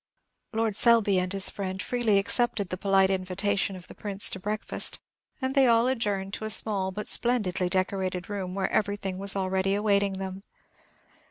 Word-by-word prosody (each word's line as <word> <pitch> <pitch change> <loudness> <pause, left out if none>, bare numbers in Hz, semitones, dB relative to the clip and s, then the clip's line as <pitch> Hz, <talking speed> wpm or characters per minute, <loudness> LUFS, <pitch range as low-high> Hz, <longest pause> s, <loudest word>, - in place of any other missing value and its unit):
Lord 225 -2 -1
Selby 220 -5 +4
and 180 0 -2
his 195 -1 +2
friend 190 -1 -5
freely 230 -1 +1
accepted 205 -1 +1
the - - -2
polite 195 0 +2
invitation 195 +2 -1
of 180 -1 -11
the - - -11
Prince 200 -1 +1
to 190 - -5
breakfast, 210 +3 -2 0.4
and 260 -1 -2
they 270 -2 +4
all 230 0 +4
adjourned 205 -6 -1
to 220 - -4
a - - -3
small 205 -3 +3
but 210 +3 -6
splendidly 200 -7 0
decorated 185 -1 -2
room, 190 -3 -5
where 195 -1 -1
everything 200 -3 -1
was 200 0 +1
already 190 0 0
awaiting 200 -2 +1
them. 190 0 -6
195 Hz, 170 wpm, -27 LUFS, 190-215 Hz, 0.4 s, Selby